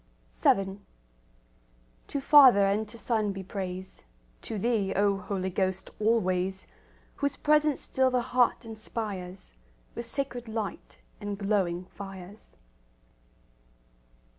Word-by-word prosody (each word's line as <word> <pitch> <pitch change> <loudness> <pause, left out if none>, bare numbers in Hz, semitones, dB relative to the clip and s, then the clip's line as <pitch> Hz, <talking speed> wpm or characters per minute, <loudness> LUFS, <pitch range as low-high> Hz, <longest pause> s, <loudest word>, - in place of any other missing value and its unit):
VII 195 -9 +2 1.3
To 285 - -2
Father 265 -8 +8
and 210 +2 0
to 230 - -9
Son 220 -3 0
be 195 -1 -6
praise, 185 - -5 0.3
To 220 - -4
Thee, 205 -2 +1
O 200 0 +3
Holy 190 -2 -3
Ghost, 190 0 -1
always, 190 -4 +1 0.5
Whose 285 -1 0
presence 300 -1 +2
still 260 0 +2
the 250 -1 +1
heart 245 -1 +2
inspires 210 - -6 0.4
With 235 0 -5
sacred 245 -2 -3
light 220 -2 -5 0.2
and 205 -1 -4
glowing 195 -4 0
fires. 195 +1 -9
205 Hz, 110 wpm, -28 LUFS, 190-235 Hz, 1.3 s, Father